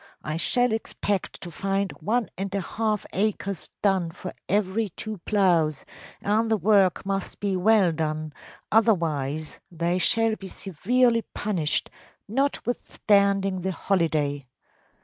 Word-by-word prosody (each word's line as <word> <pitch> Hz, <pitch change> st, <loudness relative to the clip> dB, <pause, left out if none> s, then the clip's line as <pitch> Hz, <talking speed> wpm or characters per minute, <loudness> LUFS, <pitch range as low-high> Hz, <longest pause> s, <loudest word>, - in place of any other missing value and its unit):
I 155 Hz, -, -3 dB
shall 245 Hz, +8 st, +2 dB
expect 205 Hz, -3 st, -2 dB
to 175 Hz, -, -7 dB
find 195 Hz, +2 st, -1 dB
one 230 Hz, +1 st, 0 dB
and 195 Hz, +1 st, -4 dB
a -, -, +1 dB
half 215 Hz, +3 st, -1 dB
acres 200 Hz, -2 st, -1 dB
done 190 Hz, -4 st, +2 dB
for 175 Hz, +2 st, -8 dB, 0.2 s
every 205 Hz, +2 st, +1 dB
two 215 Hz, +3 st, -6 dB
ploughs, 170 Hz, -8 st, +2 dB, 0.4 s
and 220 Hz, +2 st, +2 dB
the 220 Hz, -, +3 dB
work 195 Hz, -4 st, +3 dB
must 195 Hz, 0 st, -3 dB
be 200 Hz, -2 st, 0 dB
well 195 Hz, -1 st, +4 dB
done; 155 Hz, -1 st, -3 dB, 0.4 s
otherwise 155 Hz, -, +1 dB
they 170 Hz, +2 st, 0 dB
shall 225 Hz, +3 st, +3 dB
be 195 Hz, -, -8 dB
severely 230 Hz, +7 st, +1 dB
punished, 180 Hz, -8 st, -1 dB, 0.4 s
notwithstanding 200 Hz, -6 st, +1 dB
the 190 Hz, +1 st, -2 dB
holiday. 155 Hz, -7 st, 0 dB
195 Hz, 125 wpm, -25 LUFS, 170-215 Hz, 0.4 s, well